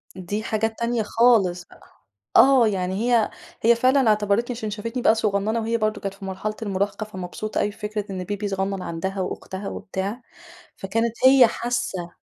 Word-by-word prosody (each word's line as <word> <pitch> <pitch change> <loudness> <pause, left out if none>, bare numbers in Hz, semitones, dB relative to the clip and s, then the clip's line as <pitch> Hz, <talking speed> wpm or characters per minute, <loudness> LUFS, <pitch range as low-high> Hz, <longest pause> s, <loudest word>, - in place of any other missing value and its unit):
دي 195 +4 -4
حاجات 220 0 -2
تانية 235 -1 0
خالص 210 -6 +3
بقى. - - -19 0.5
آه، 265 -4 +7
يعني 185 -3 -1 0.2
هي 230 -3 +3 0.3
هي 235 +1 +5
فعلًا 255 +2 +3
اعتبَرتني 215 +3 +1
عشان 220 -2 -4
شافتني 230 +4 -4
بقى 220 - +5
صغنّنة 215 +1 0
وهي 230 +1 0
برضه 215 -1 -1
كانت 195 -1 -4
في 195 0 -10
مرحلة 195 +3 -4
المراهقة، 200 0 -2
فمبسوطة 210 +1 -5
أوي 205 - +1
بفكرة 210 0 -5
إن 185 -1 -4
baby 205 0 -3
صغنّن 195 0 -2
عندها 190 +3 -3
وأختها 190 +1 -5
وبتاع، 195 +6 -5 0.6
فكانت 225 +4 -1
هي 260 -2 +8
حاسّة. 210 -8 -3
210 Hz, 160 wpm, -23 LUFS, 195-230 Hz, 0.6 s, هي